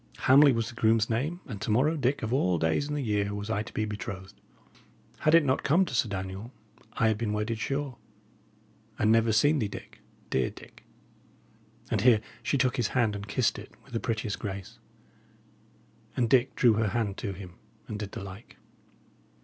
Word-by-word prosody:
Hamley 140 +2 +7
was 115 -2 0
the - - -10
groom's 115 0 +2
name, 150 +10 -1
and 105 -7 -7
to - - -3
morrow, 135 +9 +3
Dick, 140 -2 0
of 110 +2 -1
all 90 -9 +2
days 80 - +1
in 150 - -2
the 145 - -2
year, 105 -3 0
was 105 +2 -4
I 105 -2 0
to - - -8
be 110 - -1
betrothed. 100 -2 -6 0.9
Had 155 +2 +4
it 165 -3 +6
not 130 0 +1
come 170 +7 +3
to 165 - -7
Sir 120 -2 +1
Daniel, 95 +3 -5 0.4
I 115 - +2
had 110 -1 0
been 110 -3 -1
wedded, 105 +2 -2
sure 135 0 -3 1.0
and 110 - +3
never 115 0 +4
seen 145 +8 +4
thee, 110 - 0
Dick 100 - -10 0.3
dear 65 -2 +1
Dick!" - - -15 1.1
And - - +1
here 120 -3 +6 0.2
she 140 - 0
took 125 -1 +1
his 120 -4 +1
hand, 110 -4 +2
and 100 0 -6
kissed 115 +2 +1
it, 105 - -12
with 135 - -18
the 115 - 0
prettiest 110 -4 -2
grace; 95 -2 -6 1.4
and 120 - +2
Dick 130 +2 +3
drew 120 -3 +5
her 110 0 +1
hand 105 -2 -1
to 100 -4 -4
him 90 -2 -11 0.3
and 105 - -5
did 100 -2 -6
the - - -6
like. 100 +4 -11
110 Hz, 195 wpm, -28 LUFS, 105-130 Hz, 1.4 s, Hamley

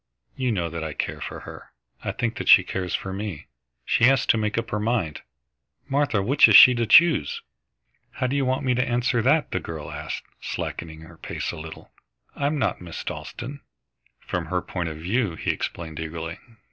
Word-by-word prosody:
You 130 -2 0
know 90 -6 -1
that 85 -1 -5
I 80 -1 -4
care - - -4
for - - -6
her. - - -11 0.3
I - - -2
think 115 -1 -2
that - - -3
she 95 - +9
cares 90 -1 -3
for 95 - -4
me. 100 -5 -5 0.4
She 115 - +3
has 135 0 +4
to - - +4
make 105 +1 -1
up 115 0 -2
her 105 - -1
mind. 105 -8 -1 0.7
Martha, 135 -8 +1
which 135 +8 +6
is - - +5
she 130 - +11
to 120 -2 -1
choose?" 165 - +5 0.7
"How 130 - -2
do 130 +2 0
you 140 - +1
want 130 +1 0
me 125 - +2
to 125 +1 +1
answer 120 0 +1
that?" 145 +6 +2
the 95 - 0
girl 80 -3 -7
asked, - - -5 0.2
slackening 80 -1 -5
her 80 +1 -14
pace - - -4
a - - -8
little. 80 0 -10 0.4
"I'm 145 +2 0
not 135 - -1
Miss 85 -2 -7
Dalstan." 135 +4 -6 0.6
"From - - -4
her - - -1
point 85 -3 -3
of 80 - -7
view," 95 +3 -1
he - - -1
explained 80 -2 -5
eagerly. 80 +2 -5
105 Hz, 195 wpm, -24 LUFS, 85-125 Hz, 0.7 s, she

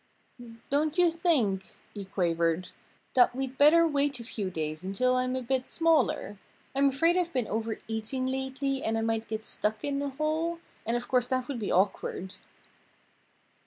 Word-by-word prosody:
"Don't 300 +3 +1
you 350 -2 +5
think," 255 - +1 0.2
he 200 -2 -6
quavered, 170 -2 0 0.4
"that 245 -1 +5
we'd 265 0 -4
better 330 +3 +7
wait 285 -3 0
a - - -7
few 210 -4 -3
days 155 -1 -4
until 250 +7 +1
I'm 255 0 0
a 260 - -3
bit 255 +1 -1
smaller? 310 -10 +1 0.3
I'm 275 +1 +4
afraid 330 +6 +2
I've 350 -1 0
been 250 -7 0
overeating 225 +3 -3
lately 265 +1 -2
and 225 0 0
I - - 0
might 225 0 -1
get 220 0 -4
stuck 215 0 -2
in 280 -1 -1
a 285 - -1
hole. 310 +4 -1 0.3
And 235 +1 +1
of 240 - -6
course 250 -1 +2
that 255 -1 -1
would 275 -4 -4
be 210 - -2
awkward." 190 0 0
255 Hz, 165 wpm, -29 LUFS, 215-280 Hz, 0.4 s, better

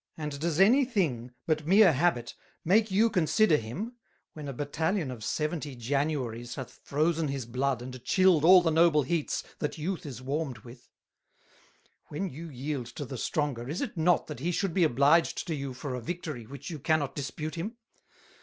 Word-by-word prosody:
And 150 -3 -5
does 165 +1 -1
any 240 +9 +6
thing, 165 - -1 0.2
but 155 -1 0
meer 195 -1 +7
Habit, 130 -5 +1 0.3
make 215 +6 +4
you 205 +4 +4
consider 180 -2 +3
him, 195 - -6 0.4
when 150 -2 -7
a - - -3
Battalion 150 +4 -1
of 115 -4 -8
Seventy 150 +2 -2
Januarys 125 -2 -2
hath 130 -3 -8
frozen 155 +2 +1
his 135 -3 -3
Blood 125 +1 -1
and 130 -1 -8
chilled 185 -5 +4
all 180 +1 +8
the 165 - +2
noble 160 -2 +4
Heats 155 +3 -1 0.2
that 150 - -3
youth 165 +1 -3
is 130 -4 -7
warmed 135 0 -3
with? 120 0 -14 1.2
When 175 +5 -4
you 165 +5 -8
yield 135 -2 -4
to 140 +4 -7
the 130 - -7
Stronger, 130 -2 -2
is 160 - -3
it - - -3
not 170 +1 +3
that - - -7
he 170 +6 -1
should 185 0 -1
be 185 - +3
obliged 145 +4 +3
to 170 - -2
you 140 -2 -4
for 130 +1 -5
a 125 - -4
Victory 150 -4 -5
which 140 +5 -8
you 155 - -6
cannot 150 -1 +1
Dispute 150 +2 -4
him? 205 +8 -5
150 Hz, 180 wpm, -29 LUFS, 130-170 Hz, 1.2 s, all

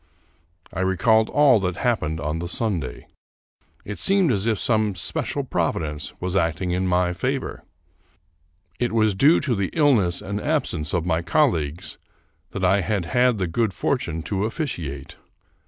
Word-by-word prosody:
I - - -4
recalled 110 +4 +2
all 140 -6 +5
that 90 -2 -2
happened 80 -11 -1
on 75 +3 -3
the 85 +1 -5
Sunday. 85 - -2 0.8
It 105 - -6
seemed 195 -6 +3
as 105 -1 0
if 110 -2 +1
some 110 -2 +1
special 90 - -2
providence 75 -2 -2
was 90 +1 -3
acting 85 0 0
in 90 +1 0
my 90 0 +1
favor. 130 +8 -3 1.2
It 120 -2 -1
was 110 -2 +3
due 140 - +5
to 140 -4 0
the 100 -4 -1
ill 145 -3 +4
ness 90 -7 +1
and 100 +2 -4
absence 125 - -1
of 85 -1 -1
my 80 -1 +1
colleagues 85 - 0 0.5
that 95 -2 -2
I 95 +2 +3
had 100 -2 -1
had 125 +4 +2
the 95 - -1
good 100 +4 -1
fortune 80 - -2
to 95 +5 -1
officiate. 85 - -5
95 Hz, 155 wpm, -23 LUFS, 85-115 Hz, 1.2 s, all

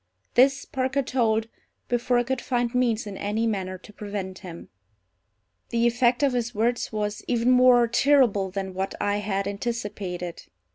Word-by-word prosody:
This 270 +3 +4
Parker 270 -1 -1
told 225 -3 +1 0.4
before 245 0 +1
I 240 - +3
could 260 0 -2
find 245 -1 -1
means 240 -3 +1
in 200 -2 -7
any 210 +3 -1
manner 190 -4 -2
to 210 - -16
prevent 200 -3 -6
him. 170 -3 -10 1.0
The 235 0 +1
effect 240 +2 +2
of 275 -2 +3
his 240 -1 -2
words 235 +3 0
was 210 -1 -3
even 240 0 +2
more 250 -1 +6
terrible 235 -6 +3
than 190 0 -4
what 190 +1 -3
I 205 0 0
had 200 -1 -2
anticipated. 200 -5 -4
230 Hz, 155 wpm, -25 LUFS, 200-245 Hz, 1.0 s, more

